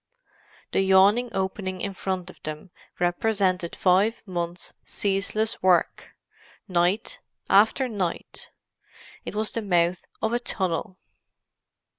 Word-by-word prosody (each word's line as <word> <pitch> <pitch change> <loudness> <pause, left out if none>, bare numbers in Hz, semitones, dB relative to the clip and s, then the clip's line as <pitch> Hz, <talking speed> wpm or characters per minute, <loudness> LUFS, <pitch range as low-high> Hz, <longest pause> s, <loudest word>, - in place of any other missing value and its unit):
The - - +2
yawning 195 +6 +5
opening 190 -2 -3
in 200 +1 -3
front 185 -1 -3
of - - -23
them 155 +4 -7 0.3
represented 180 -1 +1
five 195 +5 +2
months' 175 -2 -4
ceaseless 205 +2 -1
work, 185 -2 +2 0.5
night 185 - 0 0.3
after 220 +6 +5
night. 195 -7 -4 0.8
It - - -6
was 215 0 0
the 230 - -2
mouth 175 -3 +1 0.2
of 220 +1 -1
a 240 - +2
tunnel. 185 -4 -2
190 Hz, 110 wpm, -25 LUFS, 180-215 Hz, 0.8 s, yawning